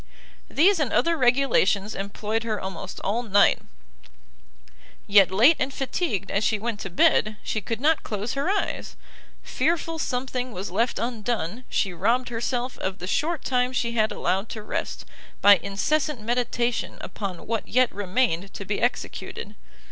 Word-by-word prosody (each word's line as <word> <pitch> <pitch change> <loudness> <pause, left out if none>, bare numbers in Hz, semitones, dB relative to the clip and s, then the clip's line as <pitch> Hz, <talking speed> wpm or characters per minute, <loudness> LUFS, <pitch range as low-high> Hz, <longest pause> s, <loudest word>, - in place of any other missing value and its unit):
These 360 +4 +4
and 285 -6 0
other 335 0 +2
regulations 245 - +2
employed 210 +3 -3
her 220 -2 -2
almost 190 0 -6
all 215 +5 0
night; 205 -4 +4 1.5
yet 200 -2 +6
late 235 - +5
and 260 - 0
fatigued 270 - -2
as 200 - +1
she 215 - +2
went 220 0 -3
to 195 - -5
bed, 215 +4 +3
she 215 - -2
could 225 +3 -4
not 310 +4 +3
close 210 +2 -4
her 275 +6 -1
eyes: 405 0 -2 0.5
fearful 330 -1 -1
something 250 -2 -2
was 185 -1 -5
left 230 +6 0
undone, 230 -2 -3
she 195 -3 0
robbed 235 +9 +1
herself 245 +2 -3
of 190 0 -3
the 180 - -6
short 305 - -1
time 250 -1 +1
she 240 -2 -1
had 220 -2 +1
allowed 195 +4 -1
to 215 - -6
rest, - - -4 0.3
by 205 -1 +8
incessant 265 - -1
meditation 240 +1 -1
upon 195 -5 -6
what 225 0 -2
yet 255 0 +3
remained 195 -2 0
to 200 - -6
be 200 +2 -2
executed. 230 -3 -3
230 Hz, 155 wpm, -25 LUFS, 200-255 Hz, 1.5 s, by